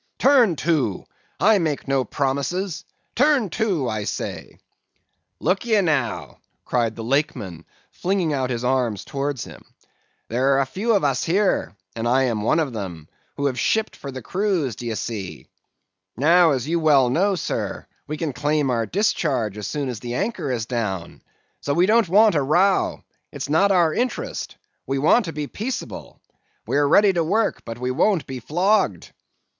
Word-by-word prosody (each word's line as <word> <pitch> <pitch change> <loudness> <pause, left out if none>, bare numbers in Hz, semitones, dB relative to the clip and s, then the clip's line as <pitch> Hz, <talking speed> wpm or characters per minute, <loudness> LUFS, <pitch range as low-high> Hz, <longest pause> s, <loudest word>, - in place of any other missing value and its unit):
"'Turn 250 - +4
to! 145 - 0 0.3
I 210 +1 +5
make 155 -5 -2
no 135 -1 +1
promises, 145 - -2 0.3
turn 270 - +3
to, 190 - 0
I 110 -2 -2
say!' - - -5 0.8
"'Look 195 - 0
ye, 225 -3 +2
now,' 150 - -1 0.3
cried 115 -3 0
the 115 - -6
Lakeman, 110 - -2 0.3
flinging 180 -4 -1
out 130 -2 -1
his 120 -1 -3
arm 125 -3 +1
towards 140 +5 -4
him, - - -12 0.7
'there 130 +4 +2
are - - +3
a 135 - +2
few 210 - 0
of 200 - +1
us 135 -3 +1
here 185 - +1 0.2
(and 115 0 -2
I 130 +2 +3
am 115 -5 0
one 135 +9 +2
of 145 -6 -1
them) 85 -8 -6 0.3
who 140 - -1
have 130 -3 0
shipped 220 - 0
for 140 - -8
the 130 -2 -8
cruise, 180 - -1
d'ye 115 0 -4
see; 105 -5 -5 0.7
now 165 +5 +5
as 135 -2 -1
you 170 +1 +1
well 140 -6 +4
know, 195 +7 +2
sir, 170 - -3 0.2
we 150 +1 -4
can 150 -3 -3
claim 145 0 0
our 115 -2 0
discharge 150 - 0
as 105 -1 -5
soon 145 -2 -3
as 125 -4 -4
the 120 +1 -5
anchor 200 - -2
is 115 -3 -2
down; 105 -8 -4 0.4
so 140 - -2
we 175 +2 +4
don't 220 -2 +3
want 210 +3 +5
a 150 - +2
row; 180 +8 +2 0.3
it's - - -6
not 195 +7 +3
our 170 -4 +3
interest; 250 +1 -3 0.3
we 135 - -1
want 160 - +4
to 165 - -4
be 150 -1 -4
peaceable; 225 - -6 0.5
we - - -2
are 145 0 +3
ready 200 +6 +5
to 170 -2 +1
work, 205 +7 0
but 115 - -6
we 125 +1 -2
won't 180 +6 +2
be 130 -1 -6
flogged. 175 - 0
145 Hz, 175 wpm, -22 LUFS, 125-185 Hz, 0.8 s, I